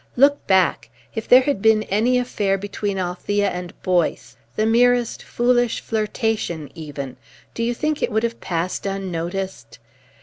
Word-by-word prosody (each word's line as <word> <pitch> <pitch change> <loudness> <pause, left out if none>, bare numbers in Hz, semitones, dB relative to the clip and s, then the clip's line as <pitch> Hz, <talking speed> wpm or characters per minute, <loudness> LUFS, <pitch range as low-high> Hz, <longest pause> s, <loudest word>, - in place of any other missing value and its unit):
Look 285 +3 +3
back. 190 -10 +2 0.2
If 220 - -5
there 250 +1 +8
had 260 -6 -1
been 220 0 +4
any 225 +6 +2
affair 205 -6 0
between 200 0 -3
Althea 190 +3 -1
and 180 -1 -7
Boyce, 180 -3 0 0.2
the 215 - +1
merest 245 +1 +3
foolish 245 -1 +1
flirtation, 215 - -2
even, 145 -5 -7 0.4
do - - -4
you 235 +1 0
think 305 +3 -1
it - - 0
would 220 +1 +1
have 235 0 -2
passed 175 +3 -2
unnoticed? 190 0 -4
205 Hz, 145 wpm, -22 LUFS, 185-235 Hz, 0.4 s, there